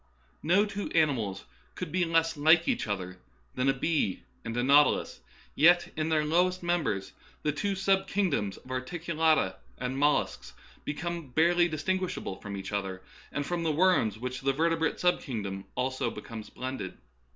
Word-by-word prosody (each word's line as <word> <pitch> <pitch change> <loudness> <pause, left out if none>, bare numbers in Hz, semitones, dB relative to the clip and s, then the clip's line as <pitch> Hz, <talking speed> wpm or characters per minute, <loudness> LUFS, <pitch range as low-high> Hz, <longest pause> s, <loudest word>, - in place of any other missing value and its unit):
No 185 +6 +4
two 205 -1 -4
animals 130 - +1 0.3
could - - -5
be 180 0 +1
less 165 0 +2
like 160 +3 +5
each 105 - 0
other 90 -3 -4 0.3
than 130 +2 +1
a - - +4
bee 135 - 0 0.2
and 115 +1 -4
a 120 - +1
nautilus, 145 +3 +4 0.3
yet 175 +4 +4
in 155 +1 -1
their 155 -1 +2
lowest 180 +3 +2
members 150 - -1 0.3
the 150 - +2
two 195 +7 -1
sub 195 0 +2
kingdoms 160 - 0
of 130 - -13
articulata 160 +3 0 0.2
and 125 +1 -3
mollusks 145 +1 +1 0.3
become 170 +1 -4
barely 170 +5 +4
distinguishable 175 - -2
from 100 -1 -7
each 95 +1 -6
other 95 -2 -3 0.3
and 145 - -2
from 175 +1 -2
the 165 -1 +1
worms 155 - +3
with 110 - -15
which 125 0 -4
the 135 0 +1
vertebrate 165 +2 +1
sub 180 0 +2
kingdom 100 -7 -5
also 130 -1 -1
becomes 110 0 -8
blended. 130 -7 -5
150 Hz, 160 wpm, -29 LUFS, 120-175 Hz, 0.3 s, like